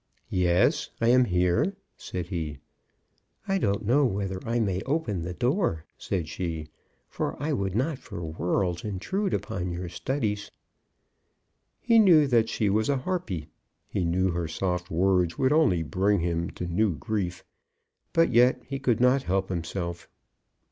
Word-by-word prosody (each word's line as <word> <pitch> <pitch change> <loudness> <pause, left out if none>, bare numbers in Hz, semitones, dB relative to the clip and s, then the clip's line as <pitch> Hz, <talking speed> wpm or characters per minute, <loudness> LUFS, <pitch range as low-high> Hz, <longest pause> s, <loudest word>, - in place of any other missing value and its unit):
"Yes; 90 -1 +2
I 115 - +3
am 125 +1 +6
here," 90 - +1 0.2
said 90 -1 -6
he. 80 -5 -3 0.9
"I 195 0 +1
don't 100 - 0
know 135 +7 +4
whether 95 -5 -1
I 120 +1 +1
may 95 -4 0
open 135 - -1
the 90 +2 -5
door," 120 - 0
said 90 -5 -3
she; 80 -2 -4 0.4
"for - - -3
I 150 +2 -1
would 95 -6 -1
not 135 +4 0
for 85 - -8
worlds 90 +2 -1
intrude 185 - -2
upon 100 -6 -2
your 90 0 -4
studies." 105 +1 -2 1.3
He 230 -1 +4
knew 170 -8 +7
that 115 -4 +3
she 110 - 0
was 110 +4 +1
a 140 - +2
Harpy. 130 - -3 0.4
He 95 - -2
knew 90 +3 +1
that 85 - -3
her 85 -2 -1
soft 90 +2 -2
words 90 0 +2
would 130 +2 +3
only 100 - +3
bring 95 +5 +1
him 85 0 -1
to 90 - -6
new 90 +2 +1
grief. 90 +3 -3 0.7
But 165 -3 +3
yet 125 +2 +5
he 135 -1 -4
could 120 -3 +1
not 125 +2 +4
help 95 -4 -1
himself. 85 0 -4
95 Hz, 155 wpm, -27 LUFS, 90-125 Hz, 1.3 s, knew